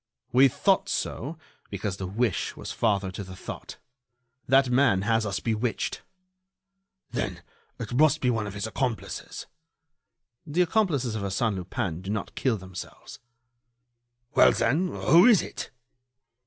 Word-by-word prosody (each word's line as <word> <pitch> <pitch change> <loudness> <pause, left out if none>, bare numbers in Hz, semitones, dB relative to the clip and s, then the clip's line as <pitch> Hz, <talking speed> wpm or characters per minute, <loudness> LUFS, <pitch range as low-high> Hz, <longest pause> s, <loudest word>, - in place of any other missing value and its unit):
"We 130 +3 +7
thought 190 +9 +1
so, 150 +7 -3 0.3
because 100 -1 -3
the 95 - -4
wish 110 +1 -1
was - - -6
father 100 -4 0
to 100 +2 -6
the 95 -1 -10
thought. - - -8 0.7
That 135 +1 +5
man 125 -7 +3
has 110 0 +1
us 95 - -2
bewitched." 115 +1 -2 1.1
"Then - - -3 0.4
it 115 +1 -5
must 145 +3 +4
be 125 - +2
one 110 -3 -1
of 100 - -7
his 105 - -3
accomplices." 120 0 -4 1.0
"The 165 +4 +1
accomplices 160 - +1
of 110 - -3
Arsène 100 +3 0
Lupin 90 -2 -3
do 95 - -8
not 105 -1 -3
kill 125 -5 0
themselves." 95 -2 -10 1.1
"Well, - - +6
then, 145 +11 +1
who 175 +2 +5
is 225 -7 +6
it?" - - -6
115 Hz, 140 wpm, -27 LUFS, 100-135 Hz, 1.1 s, We